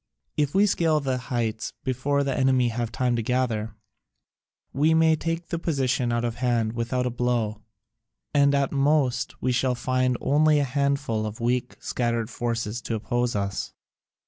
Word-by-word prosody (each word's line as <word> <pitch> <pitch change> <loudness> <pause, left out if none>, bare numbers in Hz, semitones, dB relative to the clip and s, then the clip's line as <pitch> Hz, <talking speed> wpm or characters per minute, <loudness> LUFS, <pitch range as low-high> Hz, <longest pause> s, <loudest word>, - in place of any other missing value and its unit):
If 145 +1 0
we 200 +2 +5
scale 165 -5 +2
the 130 -3 -1
heights 115 -4 -3
before 140 +3 0
the 135 -2 -1
enemy 130 -2 +3
have 115 0 -3
time 125 0 0
to - - 0
gather, 115 -3 -1 1.0
we 155 +4 +3
may 160 0 +5
take 165 +2 -3
the 170 - -2
position 130 -6 0
out 120 0 0
of 115 -1 -3
hand 120 -3 0
without 120 +2 -1
a 125 - -1
blow, 120 -3 -1 0.7
and 140 0 +4
at 140 -1 +1
most 140 -3 +1
we 130 - +2
shall 125 +1 +1
only - - -4
find 130 0 +1
a 150 +1 +3
handful 140 -5 0
of 105 +1 -7
weak 125 +1 0
and - - -29
scattered 120 -1 -1
forces 115 -1 -2
to 115 - -3
oppose 120 +2 -1
us. 100 -1 -3
125 Hz, 170 wpm, -25 LUFS, 120-140 Hz, 1.0 s, we